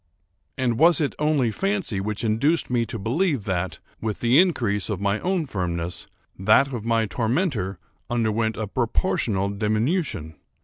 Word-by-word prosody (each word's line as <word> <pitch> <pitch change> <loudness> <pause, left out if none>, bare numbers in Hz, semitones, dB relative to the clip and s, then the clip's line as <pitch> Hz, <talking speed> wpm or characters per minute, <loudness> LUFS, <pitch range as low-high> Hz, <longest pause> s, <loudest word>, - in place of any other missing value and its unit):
And 125 -3 0
was 170 +2 +6
it 145 -3 0
only 150 -6 +2
fancy 190 - -1
which 105 +3 -3
induced 125 +9 +1
me 120 -2 +1
to 115 - -4
believe 135 - 0
that, 90 -5 -2 0.2
with 110 -2 -3
the 120 +5 +4
increase 120 - +2
of 100 -4 -2
my 100 +1 0
own 180 -3 0
firmness, 85 - -3 0.3
that 110 +8 +4
of 115 -4 -4
my 115 -1 +2
tormentor 115 - -1 0.3
underwent 110 -1 0
a 110 - -2
proportional 110 - 0
diminution? 110 - -1
115 Hz, 145 wpm, -24 LUFS, 100-140 Hz, 0.3 s, was